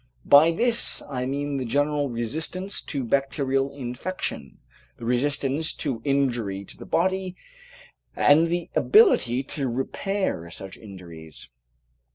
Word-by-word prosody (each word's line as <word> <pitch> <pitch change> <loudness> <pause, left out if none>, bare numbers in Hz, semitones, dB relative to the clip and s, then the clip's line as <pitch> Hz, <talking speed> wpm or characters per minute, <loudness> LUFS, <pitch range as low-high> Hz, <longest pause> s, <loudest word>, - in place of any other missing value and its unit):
By 145 +3 +7
this 235 +8 +2
I 125 -1 -2
mean 140 +1 -2
the 130 - -2
general 145 +3 0
resistance 160 - -3
to 140 -3 -3
bacterial 135 +1 0
infection, 125 - -5 0.4
the 115 - -8
resistance 140 +4 0
to 130 -7 -3
injury 120 -9 0
to - - -11
the - - -11
body, 185 +1 0 0.8
and 155 +3 +5
the 175 0 -3
ability 135 - +4
to 135 -1 -3
repair 135 - -2
such 95 +2 -7
injuries. 85 - -10
135 Hz, 120 wpm, -25 LUFS, 120-160 Hz, 0.8 s, By